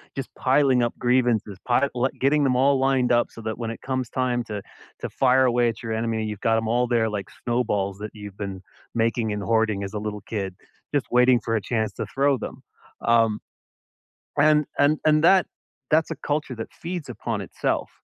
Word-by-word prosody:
Just 135 -2 -4
piling 130 -1 +3
up 120 - 0
grievances, 120 -5 +1
pile 130 +3 +3
le 125 +1 +1
getting 145 +2 +3
them 125 - +2
all 135 +2 +3
lined 130 -2 +2
up 120 0 +3
so 115 - -11
that 110 0 -4
when 115 -2 -3
it - - -9
comes 130 -2 -2
time 125 -2 0
to 105 -2 -5 0.4
to - - -3
fire 130 0 +3
away 120 -1 +3
at 115 +1 -7
your 115 - -4
enemy, 110 0 -1
you've 105 -2 -4
got 115 +1 +2
'em 110 - -1
all 120 +1 +2
there 115 -2 +2
like 100 -2 -4 0.2
snowballs 105 -5 0
that 105 0 -6
you've 105 -2 -10
been 95 -2 -5 0.3
making 115 -1 +1
and 105 0 -4
hoarding 110 -3 +1
as 100 +2 -6
a 105 - -2
little 105 -1 -4
kid, 100 -3 -4 0.4
just 140 - +1
waiting 125 0 +5
for 115 - -1
a - - -2
chance 110 0 -1
to - - -4
throw 140 0 +1
them. - - -8 0.4
Um, 115 -2 +3 1.0
and 150 0 +5
and 145 +2 +4
and 155 0 +5
that 190 +2 +6 0.5
that's 160 +1 +3
a - - -2
culture 145 -3 -2
that 115 0 -7
feeds 170 -5 -5
upon 110 -2 -3
itself. 95 - -2
120 Hz, 205 wpm, -24 LUFS, 110-130 Hz, 1.0 s, that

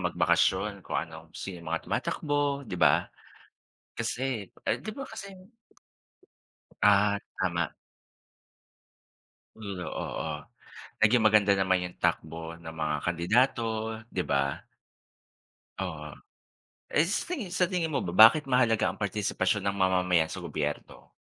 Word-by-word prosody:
magbakasyon - - +1
kung - - -4
ano, 80 +1 -5
sino 90 -3 -6
yung 85 - -9
mga 85 0 -2
tumatakbo, 145 -2 -1
di 105 - -11
ba? - - +5 0.9
Kasi 120 -2 -2 0.2
ay 115 - +1
di 215 - -6
ba 275 - -5
kasi 220 -3 -8 1.5
Ah, 100 0 +5 0.2
tama. 85 -3 -1 1.8
Oo, 95 -5 -5 0.7
naging 110 +3 +5
maganda 105 -2 +5
naman 95 -1 +2
yung 90 - -7
takbo 80 0 -2
ng 85 -1 -9
mga 80 -2 -1
kandidato, 110 +9 +2 0.4
di - - -2
ba? 70 0 0 1.2
Oo. 80 -5 -5 0.8
Eh, 155 +3 +3
sa 195 - 0
tingin 290 - -4
sa 180 - +4
tingin 175 -3 0
mo 155 - -1
ba 85 - -3 0.2
bakit 150 +5 -1
mahalaga 125 -5 +2
ang 95 - -14
partisipasyon 100 0 0
ng 100 0 0
mamamayan 90 -3 +3
sa - - -7
gobyerno? - - -5
100 Hz, 120 wpm, -28 LUFS, 85-125 Hz, 1.8 s, ba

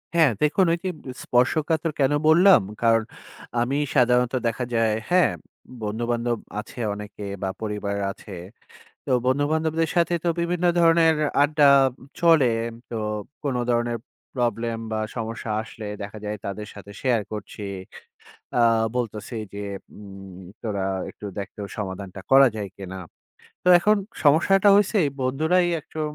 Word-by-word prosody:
হ্যাঁ 160 -7 +5
দেখুন, 155 +5 +3
ওইযে 185 +2 -2
বি 130 - -9
স্পর্শকাতর 155 +6 +1
কেন 135 0 +3 0.2
বললাম? 180 +5 +7 0.2
কারণ 115 -1 +4 0.6
আমি 125 +3 0 0.2
সাধারণত 125 -1 +3
দেখা 115 +2 -2
যায়, 115 -2 +2 0.2
হ্যাঁ? 180 0 +4 0.5
বন্ধু-বান্ধব 120 +2 -1 0.2
আছে 110 +3 -9
অনেকে 105 0 -8 0.2
বা, 95 - 0
পরিবার 105 -2 -3 0.2
আছে। 100 +1 -13 0.7
তো - - -7 0.2
বন্ধু-বান্ধবদের 155 +4 +1
সাথে 170 0 +2
তো - - -1
বিভিন্ন 175 +1 -1
ধরনের 165 -1 +5
এ - - 0
আড্ডা 145 0 +4 0.5
চলে। 165 -6 +5 0.2
এম 115 - -8
তো 115 - -5 0.5
কোন 140 -3 -1
ধরনের 120 0 +1 0.4
প্রবলেম 115 -1 -1
বা, 110 - -1 0.2
সমস্যা 115 -1 -4
আসলে 110 0 -9 0.2
দেখা 100 +2 -8
যায় 105 0 -3
তাদের 105 +2 -5
সাথে 100 0 -11
শেয়ার 120 -4 +2
করছি। 105 0 -7 1.0
আ - - +4 0.4
বলতেছি 115 -1 -4 0.2
যে 100 - -5 0.3
উম 95 -2 -11 0.2
তোরা 100 -4 -2 0.3
একটু 105 - -10
দেখতো, 100 +1 -7 0.2
সমাধানটা 95 -1 -6
করা 135 0 +8
যায় 100 -2 -4
কিনা? 95 -1 -8 0.7
তো 180 - +1
এখন 210 +4 +3 0.3
সমস্যাটা 190 +7 +5
হইছে 205 +1 +2 0.2
বন্ধুরাই 160 +8 +2 0.2
একটু 160 - -8
120 Hz, 135 wpm, -24 LUFS, 105-160 Hz, 1.0 s, করা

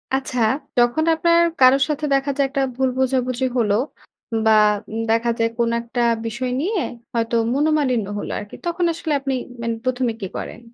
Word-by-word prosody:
আচ্ছা, 260 -2 -2 0.4
যখন 240 +6 +3
আপনার 335 +1 +3 0.2
কারোর 260 +2 +6
সাথে 300 0 -1
দেখা 275 +1 0
যায় 280 -1 +2
একটা 275 0 -1
ভুল 260 +1 +1
বোঝাবুঝি 255 -1 0
হলো 210 -4 +2 0.7
বা 220 - +5 0.4
উম 225 +1 -3
দেখা 230 +1 +2
যায় 230 - +2
কোন 235 -1 +1
একটা 235 +1 -3 0.2
বিষয় 240 +3 -3
নিয়ে 385 +3 0 0.3
হয়তো 230 0 0 0.2
মনোমালিন্য 285 -6 +1
হলো - - -5
আরকি। 205 - -9
তখন 345 +1 0
আসলে 320 -1 -3
আপনি 270 -1 -2 0.3
মানে 230 0 -1
প্রথমে 255 -1 0
কী 195 - -3
করেন? - - -6
255 Hz, 170 wpm, -21 LUFS, 235-280 Hz, 0.7 s, কারোর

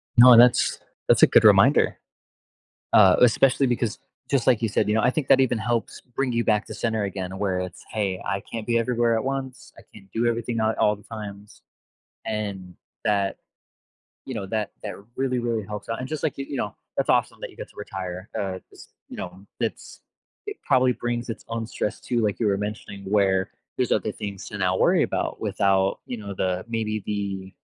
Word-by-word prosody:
No, 120 0 +9
that's 120 +1 +5 0.3
that's - - +5
a - - +10
good - - +5
reminder. - - +5 1.0
Uh, - - +7
especially 135 +3 +4
because 120 -3 -1 0.3
just 135 -4 +1
like 125 -4 +4
you 115 - +2
said, 105 - 0
you 105 - +2
know, 110 - +2
I 125 - +4
think 140 +1 -3
that 135 - +6
even 125 -3 +2
helps 115 +1 -2
bring 125 +1 -3
you 115 0 +1
back 105 -1 +2
to - - -7
center 110 -2 -1
again, 95 -1 -5
where 95 -2 0
it's, 90 0 -7
"Hey, 100 -4 -1
I 100 - -1
can't 110 +1 -7
be 115 -1 +2
everywhere 120 0 +1
at 110 - -1
once, 135 -1 -4
I - - -12
can't 95 -2 -16
do 115 +1 0
everything 120 0 -1
at 110 0 +1
all 105 0 +3
the 100 - -18
times." 105 -2 -9 0.6
And, 100 -4 -4 0.3
that 100 -2 +1 0.9
you 130 - -5
know, 105 -4 -4
that 105 0 -2
that - - -5 0.2
really, 130 -1 0
really 115 -3 -1
helps 105 0 -7
out, 115 - -2
and 130 - -5
just, 155 0 -4
like, 160 - -1
you 135 - -4
you 140 - -4
know, 105 -5 -3 0.2
that's - - +1
awesome - - +1
that - - -6
you - - -19
get - - -8
to - - -24
retire, 95 -2 -6
uh, 95 -2 -3
just - - -15 0.2
you - - -8
know, 95 +2 -8
it's - - -4 0.5
it 415 - -5
probably 130 -2 +4
brings 120 0 -3
its 115 - -7
own 115 -1 -3
stress 105 - -3
too- 120 - -2
like 105 -2 0
you 115 - +2
were 100 -1 +2
mentioning- 105 -1 -6
where 95 -2 +2 0.3
there's - - 0
other - - 0
things 100 -2 -7
to 105 - -7
now 95 -1 +1
worry - - +4
about - - -2
without, 95 -1 +1
you 125 - -4
know, 100 -2 -7
the 95 -1 -1
maybe 110 -2 -2
the, 100 -2 -4
110 Hz, 210 wpm, -24 LUFS, 100-120 Hz, 1.0 s, a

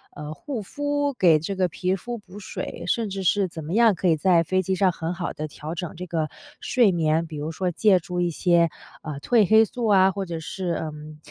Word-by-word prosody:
呃， 150 +1 -6
护 230 - -5
肤， 290 +6 -2
给 170 -10 +4
这 190 +6 -4
个 185 -1 +1
皮 185 +3 -1
肤 240 +5 -6
补 200 -2 -14
水， 205 - -6
甚 225 +2 0
至 195 0 -4
是 195 +2 +2
怎 165 -2 -8
么 155 - -6
样 225 -2 +5
可 180 - +1
以 160 - +3
在 170 0 +4
飞 185 +3 +1
机 190 +1 -1
上 185 0 +3
很 165 0 -4
好 175 -1 -4
地 155 - -5
调 155 +1 -7
整 175 -2 -5
这 180 +2 -6
个 160 -2 -1 0.3
睡 240 -6 +3
眠， 165 -1 +1
比 155 -2 -8
如 150 +2 -4
说 180 +2 -1
借 190 +1 +4
助 180 +2 -5
一 175 -1 +1
些， 170 0 +3 0.3
呃， 150 -3 -5
褪 220 -2 +3
黑 220 0 +7
素 230 +1 -3
啊， 190 -2 +5
或 195 +1 -4
者 170 -2 -5
是， 180 +2 -4
嗯， 150 -1 -8
180 Hz, 250 characters per minute, -24 LUFS, 160-200 Hz, 0.3 s, 黑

